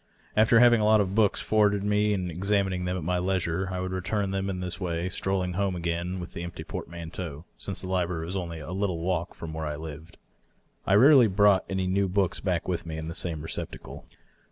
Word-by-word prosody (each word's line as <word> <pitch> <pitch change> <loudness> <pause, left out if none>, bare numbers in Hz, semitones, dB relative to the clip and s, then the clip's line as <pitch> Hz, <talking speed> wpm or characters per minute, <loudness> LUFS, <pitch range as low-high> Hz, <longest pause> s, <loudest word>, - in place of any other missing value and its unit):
After 110 +2 +5
having 120 -2 +6
a - - +2
lot 110 0 +5
of 95 -2 0
books 105 -2 +3
forwarded 105 -2 +2
me 105 +1 +2
and 90 -3 -1
examining 95 +1 0
them 90 +1 -1
at 90 - -5
my 90 +2 0
leisure, 95 0 -1
I 90 - -3
would 95 0 -3
return 95 +2 -1
them 95 0 -1
in 95 -1 -3
this 90 +1 -5
way, 90 -1 -2
strolling 95 0 -1
home 95 0 0
again 85 +2 -2
with 90 -1 -8
the - - -5
empty 85 0 -6
portman 85 0 -7
teau, 80 -5 -6
since 100 - -3
the 95 - -6
library 90 -3 -1
was 90 +3 -5
only 85 -3 -4
a 75 +2 -7
little 95 -2 -1
walk 85 0 -2
from 80 -1 -7
where 80 -1 -3
I 75 - -3
lived. 80 +1 -9 0.7
I 95 - +4
rarely 130 +2 +7
brought 100 -1 +4
any 95 -1 -1
new 95 +1 +1
books 95 -1 0
back 90 -3 -1
with 90 -2 -1
me 80 -2 -6
in 80 0 -5
the - - -5
same 80 -3 -2
receptacle. 80 - -7
90 Hz, 225 wpm, -27 LUFS, 85-100 Hz, 0.7 s, rarely